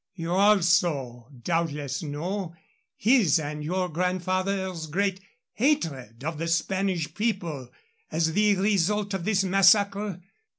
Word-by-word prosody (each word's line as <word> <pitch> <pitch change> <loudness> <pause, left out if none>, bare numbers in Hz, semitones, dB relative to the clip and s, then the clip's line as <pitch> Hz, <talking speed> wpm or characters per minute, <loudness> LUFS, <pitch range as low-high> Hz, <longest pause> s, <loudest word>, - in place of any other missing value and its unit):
_ - - -66
You 165 -2 -5
also 175 - +2 0.2
doubtless 150 -5 -2
know 170 +4 -4 0.4
his 215 - +4
and 150 0 -5
your 180 +4 -1
grandfather's 185 0 -2
great 190 +4 -1 0.3
hatred 140 - -1
of 160 0 -4
the 165 - -2
Spanish 170 -1 -1
people 175 - -3 0.4
as 160 0 0
the 210 +1 +3
result 200 +1 +1
of 185 -3 -3
this 200 -3 +2
massacre? 195 0 +3
180 Hz, 120 wpm, -26 LUFS, 160-200 Hz, 0.4 s, his